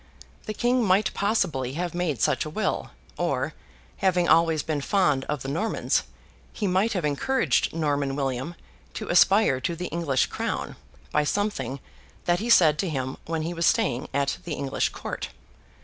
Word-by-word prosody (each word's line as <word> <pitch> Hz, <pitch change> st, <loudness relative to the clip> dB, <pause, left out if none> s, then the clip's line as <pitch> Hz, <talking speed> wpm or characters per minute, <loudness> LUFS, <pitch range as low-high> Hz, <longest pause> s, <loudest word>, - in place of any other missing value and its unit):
The 215 Hz, -, -3 dB
King 245 Hz, +2 st, +2 dB
might 195 Hz, +1 st, +3 dB
possibly 165 Hz, -, 0 dB
have 175 Hz, +3 st, -3 dB
made 170 Hz, -8 st, -1 dB
such 150 Hz, -3 st, +2 dB
a 155 Hz, -, -5 dB
will; 215 Hz, +8 st, -2 dB, 0.3 s
or, -, -, -1 dB, 0.4 s
having 180 Hz, -2 st, +2 dB
always 160 Hz, -2 st, +4 dB
been 150 Hz, -3 st, -2 dB
fond 150 Hz, -6 st, +2 dB
of 150 Hz, -3 st, -3 dB
the -, -, -5 dB
Normans, 165 Hz, +11 st, 0 dB, 0.5 s
he 210 Hz, -, -3 dB
might 195 Hz, +4 st, +2 dB
have 180 Hz, -6 st, -1 dB
encouraged 150 Hz, -, +1 dB
Norman 145 Hz, -4 st, 0 dB
William 135 Hz, +3 st, -2 dB, 0.4 s
to -, -, -5 dB
aspire 180 Hz, -6 st, +4 dB
to 170 Hz, -, -1 dB
the 180 Hz, +2 st, -5 dB
English 155 Hz, -6 st, +1 dB
crown, -, -, -3 dB, 0.4 s
by 150 Hz, -, +2 dB
something 205 Hz, -5 st, -1 dB, 0.5 s
that 175 Hz, 0 st, +2 dB
he 230 Hz, +3 st, -3 dB
said 155 Hz, -9 st, +6 dB
to 190 Hz, -, 0 dB
him 130 Hz, -3 st, -3 dB
when 160 Hz, -1 st, -2 dB
he 170 Hz, +2 st, -3 dB
was 170 Hz, -1 st, +1 dB
staying 125 Hz, -1 st, +1 dB
at 140 Hz, 0 st, 0 dB
the 165 Hz, -3 st, -4 dB
English 140 Hz, -1 st, -1 dB
court. -, -, -6 dB
165 Hz, 165 wpm, -26 LUFS, 140-190 Hz, 0.5 s, said